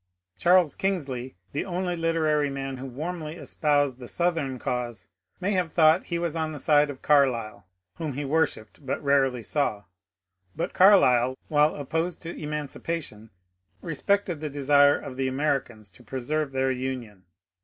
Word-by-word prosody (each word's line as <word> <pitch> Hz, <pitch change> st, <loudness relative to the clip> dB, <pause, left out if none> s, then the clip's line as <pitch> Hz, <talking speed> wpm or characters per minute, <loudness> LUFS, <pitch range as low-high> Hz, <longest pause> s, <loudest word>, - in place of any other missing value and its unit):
Charles 175 Hz, -3 st, +4 dB
Kingsley, 135 Hz, -, -3 dB, 0.2 s
the 145 Hz, -, -2 dB
only 180 Hz, -1 st, -2 dB
literary 160 Hz, -3 st, +1 dB
man 135 Hz, -1 st, -4 dB
who 135 Hz, +1 st, -6 dB
warmly 155 Hz, +4 st, -5 dB
espoused 145 Hz, -5 st, 0 dB
the 125 Hz, -, -9 dB
Southern 165 Hz, -6 st, -1 dB
cause, 120 Hz, -6 st, -4 dB, 0.3 s
may 190 Hz, +2 st, -1 dB
have 180 Hz, -5 st, 0 dB
thought 160 Hz, +2 st, +4 dB
he 170 Hz, -, -2 dB
was 170 Hz, -2 st, -2 dB
on 160 Hz, -1 st, -2 dB
the -, -, -6 dB
side 150 Hz, 0 st, +3 dB
of 135 Hz, -2 st, -8 dB
Carlyle, 115 Hz, -9 st, +2 dB, 0.3 s
whom 160 Hz, -4 st, -3 dB
he 145 Hz, +2 st, -4 dB
worshipped 145 Hz, -5 st, -1 dB
but 135 Hz, -, -2 dB
rarely 135 Hz, -4 st, +2 dB
saw; 110 Hz, -6 st, -1 dB, 0.7 s
but -, -, -3 dB
Carlyle, 130 Hz, -10 st, +5 dB
while 150 Hz, 0 st, +3 dB
opposed 160 Hz, +5 st, -2 dB
to 170 Hz, +1 st, -6 dB
emancipation, 150 Hz, -5 st, -5 dB, 0.5 s
respected 175 Hz, +1 st, 0 dB
the 155 Hz, 0 st, -4 dB
desire 145 Hz, 0 st, +4 dB
of 130 Hz, -, -8 dB
the 135 Hz, 0 st, 0 dB
Americans 130 Hz, -6 st, -2 dB
to 110 Hz, -, -18 dB
pre 130 Hz, +2 st, -5 dB
serve 150 Hz, +3 st, -1 dB
their 130 Hz, 0 st, +1 dB
Union. 125 Hz, -7 st, -5 dB
145 Hz, 155 wpm, -26 LUFS, 130-165 Hz, 0.7 s, Carlyle